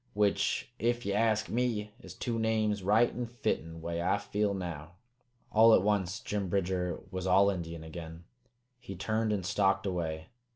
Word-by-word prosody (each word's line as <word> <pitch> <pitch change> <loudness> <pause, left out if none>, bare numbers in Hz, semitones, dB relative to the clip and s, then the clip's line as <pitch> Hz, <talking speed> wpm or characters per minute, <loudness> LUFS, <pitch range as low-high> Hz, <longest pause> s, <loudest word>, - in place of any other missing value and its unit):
Which, 100 +2 +1
ef 120 +1 0
ye 100 - 0
ask 110 0 +2
me, 115 -4 -1
is - - -11
two 115 -2 -2
names 110 -2 +1
right 105 +5 +4
an' 120 -1 -4
fitten, 80 -8 -3
way 85 0 -2
I 95 +3 +2
feel 100 0 -1
now." 85 -3 -6 0.6
All 110 +1 +7
at - - +3
once 100 -2 0
Jim 100 -3 -3
Bridger 90 -1 -1
was 95 -1 -3
all 100 +2 +5
Indian 85 -3 -5
again. 80 +1 -8 0.6
He 95 - -8
turned 110 +4 0
and 100 -4 -1
stalked 95 +2 +2
away. 80 -4 -3
100 Hz, 165 wpm, -31 LUFS, 90-110 Hz, 0.6 s, All